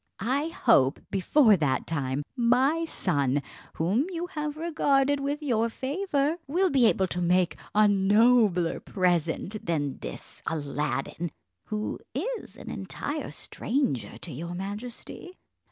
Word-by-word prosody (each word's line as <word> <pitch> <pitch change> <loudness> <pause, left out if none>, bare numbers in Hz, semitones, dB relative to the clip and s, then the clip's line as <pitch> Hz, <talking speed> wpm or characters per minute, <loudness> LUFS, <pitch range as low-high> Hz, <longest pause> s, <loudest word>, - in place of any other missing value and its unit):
I 265 +9 0
hope, 225 - +3
before 215 +4 +5
that 135 -5 0
time, 140 -3 -1
my 260 +7 +3
son, 145 - 0 0.3
whom 200 - +1
you 345 -1 -3
have 300 -1 -3
regarded 285 -4 +2
with 285 +2 -2
your 230 -4 +1
favour, 290 - -1
will 360 +5 +2
be 255 -4 +5
able 190 -3 +2
to 180 -1 -3
make 180 0 +2 0.2
a 215 0 +6
nobler 205 -2 +4
present 180 +2 -1
than 145 -5 -1
this - - -9
Aladdin, 150 +2 -2 0.4
who 215 0 -3 0.2
is 465 - -4
an - - -8
entire - - -4
stranger 230 - -2
to 170 -1 -8
your 170 +6 -5
majesty." 220 - -7
215 Hz, 125 wpm, -27 LUFS, 170-280 Hz, 0.4 s, a